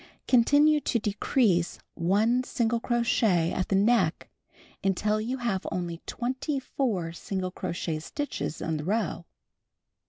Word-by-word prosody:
Continue 290 +5 +5
to 250 - 0
decrease 205 -3 +1 0.2
1 215 +8 +2
single 235 -2 0
crochet 230 -8 +2
at 185 - -1
the 195 - +2
neck 225 +5 +2 0.5
until 210 +3 +1
you 250 +4 -2
have 230 -7 -2
only 170 -2 -3
24 255 - -2
single 185 +1 -4
crochet 170 -3 -3
stitches 285 - -4
in 160 -1 -1
the 150 - -5
row. 190 -2 -1
215 Hz, 120 wpm, -27 LUFS, 180-245 Hz, 0.5 s, Continue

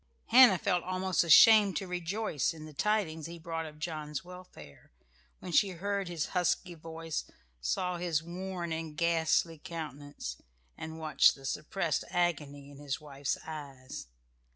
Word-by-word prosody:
Hannah 240 -5 +8
felt 180 -3 0
almost 185 0 0
ashamed 205 +4 +7
to 195 - -3
rejoice 180 - -2
in 155 -1 -9
the 155 - -11
tidings 165 -4 0
he 170 0 -8
brought 165 -1 -4
of 150 -1 -12
John's 150 -2 -4
welfare, 180 - -13 0.5
when 180 - -8
she 200 +4 +4
heard 200 +1 -2
his 170 -4 -3
husky 180 0 0
voice, 165 0 -6 0.3
saw 175 - -1
his 170 -3 -1
worn 175 0 -4
and 160 -1 -5
ghastly 165 -1 +2
countenance, 145 - -7 0.3
and 160 0 -7
watched 155 -1 +4
the 135 - -13
suppressed 155 +3 -1
agony 145 -5 -1
in 140 - -13
his 145 -2 -3
wife's 140 -2 -3
eyes. 140 - -8
165 Hz, 145 wpm, -31 LUFS, 150-180 Hz, 0.5 s, Hannah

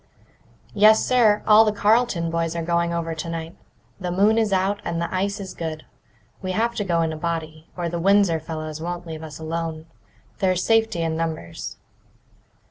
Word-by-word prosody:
"Yes, 215 +1 +5
sir; 225 -5 +3
all 215 +1 +7
the 215 - +2
Carleton 210 -5 +2
boys 165 0 -1
are 170 - -2
going 170 +1 0
over 165 -1 -2
tonight. 165 +1 -5 0.4
The 180 -2 -3
moon 205 +5 +3
is 220 -2 +1
out, 195 +2 +1
and 165 - -2
the 170 +1 -3
ice 200 +2 -1
is 190 -2 -7
good. 160 -2 -5 0.6
We 185 0 -3
have 230 +4 +1
to 205 - 0
go 170 -3 +1
in 160 -1 -1
a - - -6
body, 160 -1 -4
or 175 -1 -2
the 170 0 -3
Windsor 195 -3 +4
fellows 155 -1 -6
won't 175 +1 -4
leave 160 -1 -7
us 155 -2 -8
alone. 160 0 -4 0.5
There's 185 -1 +1
safety 225 -6 +2
in 160 -1 -1
numbers." 160 - -4
170 Hz, 180 wpm, -23 LUFS, 165-200 Hz, 0.6 s, all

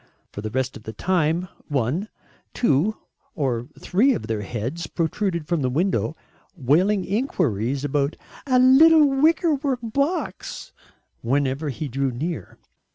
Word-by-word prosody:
For 105 - -7
the 110 - -4
rest 130 +2 -2
of - - -9
the 110 +1 -8
time, 170 - 0 0.2
one, 145 - -1 0.5
two, 210 - +2 0.4
or 125 -7 -1
three 245 +8 +2
of - - -5
their 110 -2 -2
heads 120 - -4
protruded 170 0 -2
from 170 -3 0
the 130 - +1
window 160 +2 0 0.4
wailing 180 +9 +2
enquiries 140 - -1
about 145 +1 0 0.3
"a 255 -2 +3
little 300 +5 +7
wickerwork 285 -2 +2
box" 280 +10 -3 0.5
whenever 140 +4 0
he 150 +3 -4
drew 135 +1 -1
near. 140 - -5
160 Hz, 130 wpm, -23 LUFS, 130-220 Hz, 0.5 s, little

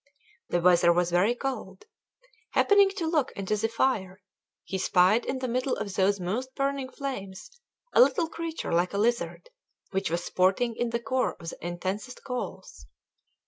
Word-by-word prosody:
The 175 - +1
weather 175 0 +5
was 175 0 +1
very 195 +7 +3
cold. 235 -8 -5 0.7
Happening 405 -1 +5
to 340 - -1
look 315 -5 +1
into 200 +2 -2
the 215 +2 0
fire, 215 -5 0 0.4
he 190 - -4
spied 190 +5 +3
in 265 - -1
the 255 0 -3
middle 255 +2 0
of 205 -2 -5
those 195 +1 +2
most 235 +9 -3
burning 275 -1 -1
flames 250 - -6 0.4
a - - +7
little 280 +6 +4
creature 330 0 -5
like 175 +3 +1
a - - -1
lizard, 235 - -1 0.4
which 195 -2 -1
was 170 +1 -1
sporting 195 +6 +1
in 240 +1 -1
the 235 0 -1
core 255 +2 -1
of 165 - -6
the - - -10
intensest 185 +8 -4
coals. 250 -2 -6
220 Hz, 165 wpm, -27 LUFS, 185-260 Hz, 0.7 s, a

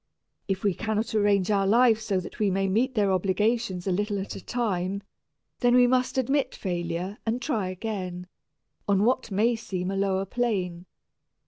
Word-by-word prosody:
If 195 -1 -2
we 200 -2 +2
cannot 220 +3 -2
arrange 205 -2 +2
our 195 -1 +2
lives 225 0 +4
so 195 -4 +1
that 180 - -10
we 210 -2 +2
may 195 +1 0
meet 245 +7 +1
their 205 -3 +2
obligations 190 +1 0
a 195 - 0
little 205 +2 0
at 195 0 -5
a - - -8
time, 200 -5 -2 0.6
then 245 -1 +4
we 250 0 +7
must 255 +1 +1
admit 270 +2 +1
failure 175 +1 -3
and 225 +2 -1
try 230 -8 -1
again, 185 -2 -4 0.6
on 200 0 +3
what 245 -1 +1
may 220 +4 +2
seem 195 -5 -4
a - - -2
lower 195 0 0
plane. 185 -6 -2
200 Hz, 175 wpm, -26 LUFS, 190-230 Hz, 0.6 s, we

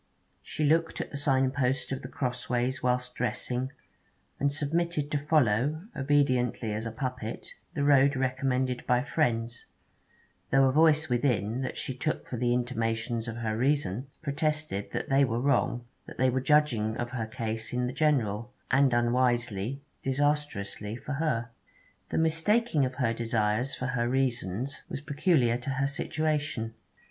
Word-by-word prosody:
She 155 - -4
looked 160 +2 +2
at - - -4
the 145 - -4
signpost 135 -1 +1
of 135 - -2
The - - -6
Crossways 125 0 -1
whilst 125 0 0
dressing, 125 +2 -2 0.7
and 140 0 +2
submitted 150 +1 -1
to 145 - +1
follow, 145 +1 +2
obediently 130 -5 +1
as 110 +2 -3
a - - -4
puppet, 125 -1 -5 0.2
the 145 - 0
road 140 0 +5
recommended 130 -1 0
by 125 0 +3
friends, 120 -6 -1 0.8
though 135 0 +5
a 130 - +4
voice 155 +1 +4
within, 120 -2 +1
that 130 - -4
she 130 - -4
took 155 +4 -2
for 125 - -5
the 120 +1 +1
intimations 115 -1 -1
of 115 - -4
her 110 -2 -2
reason, 130 -2 0 0.2
protested 150 -7 -1
that - - -3
they 135 +1 +5
were 120 -3 0
wrong, 120 -2 +1 0.2
that - - -10
they 130 0 +3
were 130 +1 0
judging 130 -7 +2
of 120 0 -3
her 115 -3 -3
case 110 0 -4
in 125 0 0
the 125 - -3
general, 120 -7 +1 0.2
and 135 -2 +4
unwisely 120 0 +1 0.2
disastrously 135 -7 -1
for 145 +4 -5
her. 125 -6 -1 0.6
The - - -2
mistaking 165 - +2
of 130 0 -4
her 120 -4 +1
desires 115 +1 0
for 125 - -4
her 125 -2 0
reasons 125 -2 -1
was - - -4
peculiar 145 -5 +2
to 125 - -5
her 135 +1 0
situation. 145 -5 -1
130 Hz, 155 wpm, -29 LUFS, 120-145 Hz, 0.8 s, road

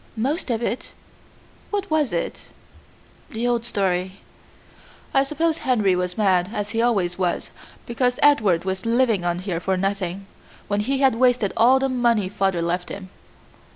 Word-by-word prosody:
"Most 275 +7 -1
of 235 -1 -1
it." 235 +3 -3 0.8
"What 405 -3 -3
was 305 -5 +2
it?" 170 - -4 0.8
"The 230 +2 -2
old 240 -1 +1
story." 190 -5 -1 1.0
"I 270 - +5
suppose 320 +3 -1
Henry 215 -7 +2
was 180 0 -2
mad, 185 -3 +2
as 205 -2 -3
he 225 0 0
always 195 -7 +1
was, 180 -2 -1 0.3
because 250 +1 0
Edward 210 - +4
was 190 0 -3
living 230 -5 +2
on 175 0 0
here 180 -2 -3
for 190 +1 -1
nothing, 195 0 -2 0.4
when 205 0 0
he 270 +6 -1
had 270 -3 +5
wasted 245 -5 +2
all 250 +3 +5
the 270 0 +1
money 235 -6 +1
father 195 -3 0
left 175 +1 -2
him." 190 -2 -8
210 Hz, 155 wpm, -23 LUFS, 185-250 Hz, 1.0 s, I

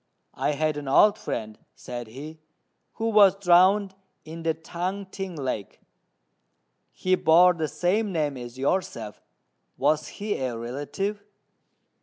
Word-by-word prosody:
"I 150 - -1
had 155 +1 0
an 145 -2 -6
old 205 +10 +5
friend," 110 -2 -5 0.2
said 120 -1 -7
he, 150 +7 -10 0.5
"who 225 0 -2
was 205 -3 +6
drowned 190 +2 +4 0.3
in 165 +1 -8
the 165 -1 0
Tung 180 +4 -4
t'ing 190 -1 -6
lake. 130 -9 -4 1.1
He 185 - -1
bore 180 +1 +6
the 160 -2 -2
same 200 +7 0
name 150 -5 -1
as 120 0 -9
yourself; 130 - -2 0.6
was 150 +1 +1
he 205 0 -2
a 125 -3 -3
relative?" 145 - -4
160 Hz, 130 wpm, -25 LUFS, 135-190 Hz, 1.1 s, was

